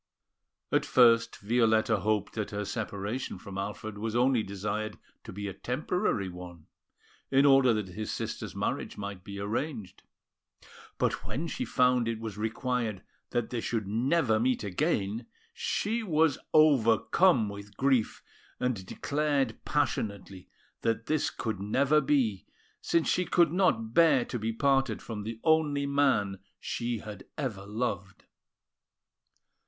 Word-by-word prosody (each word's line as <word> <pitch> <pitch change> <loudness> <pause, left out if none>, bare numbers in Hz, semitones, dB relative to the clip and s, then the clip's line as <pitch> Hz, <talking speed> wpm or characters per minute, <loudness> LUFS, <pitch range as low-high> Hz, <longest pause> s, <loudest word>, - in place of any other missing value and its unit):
At - - +3
first, 115 -2 +4
Violetta 110 0 +2
hoped 105 +1 0
that 110 -2 -3
her 105 0 -3
separation 105 +2 -4
from 95 +1 -7
Alfred 105 +1 -5
was 110 +1 -3
only 125 -1 +3
desired 105 +2 -4 0.3
to - - -9
be 100 +2 -5
a 100 - -4
temporary 125 - -1
one, 90 -2 -10 0.6
in 135 +1 +4
order 135 -3 +6
that 105 -3 -3
his 105 +4 -5
sister's - - -5
marriage - - -3
might 100 -2 -6
be 100 +1 -8
arranged; 105 - -4 1.0
but - - 0
when 150 +6 -4
she 255 +9 -3
found 125 - +2
it 115 -1 -2
was 110 -3 -6
required 110 -1 -2 0.3
that 120 -2 -2
they 120 -2 -2
should 110 -3 -2
never 120 +2 +2
meet 125 +1 +1
again, 110 - -1 0.3
she 235 - -1
was 160 -7 +2
overcome 140 - +4
with 100 0 -9
grief, 130 -5 +1 0.4
and 125 -6 -1
declared 140 -4 -1
passionately 100 -10 -2 0.3
that 115 0 0
this 155 -1 +1
could 110 -4 -4
never 135 +9 +2
be, 130 -9 +1 0.3
since 165 -1 +1
she 180 - +2
could 170 -2 +3
not 115 - +1
bear 160 -6 +5
to 120 - -4
be 110 +1 -1
parted 135 +3 +1
from 110 -3 -6
the 110 +2 -6
only 155 -3 +2
man 135 -9 +1 0.2
she 120 0 -3
had 105 -2 -9
ever 110 -10 -4
loved. 100 -3 -4
115 Hz, 140 wpm, -29 LUFS, 105-140 Hz, 1.0 s, order